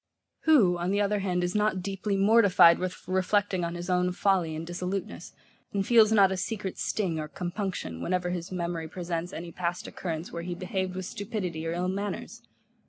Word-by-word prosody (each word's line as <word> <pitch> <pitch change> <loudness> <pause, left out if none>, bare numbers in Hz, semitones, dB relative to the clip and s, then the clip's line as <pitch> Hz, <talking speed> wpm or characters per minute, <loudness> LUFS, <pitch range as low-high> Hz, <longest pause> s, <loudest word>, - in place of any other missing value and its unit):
Who, 210 - +5
on 175 +1 -1
the 200 +1 +1
other 205 0 +1
hand, 180 -2 0
is 175 0 -1
not 210 -3 +1
deeply 195 +1 -2
mortified 200 -4 +6
with 185 -1 -5
reflecting 190 0 +1
on 170 0 -2
his 175 0 -5
own 180 0 +2
folly 180 -4 +1
and 160 +1 -5
dissoluteness, 180 +2 -4 0.4
and 195 -1 0
feels 225 -2 +6
not 200 -3 +5
a 190 - -1
secret 190 +1 -4
sting 180 -7 -1
or 155 - -4
compunction 175 - -4
whenever 180 - -1
his 175 0 -4
memory 170 -2 -3
presents 175 0 -4
any 170 +1 -7
past 175 0 -3
occurrence, 165 -2 -5
where 170 - -4
he 175 +1 -4
behaved 185 0 -3
with 185 0 -4
stupidity 185 -6 -4
of 165 +1 -2
ill 180 +1 -1
manners? 200 +2 -4
180 Hz, 185 wpm, -28 LUFS, 175-195 Hz, 0.4 s, mortified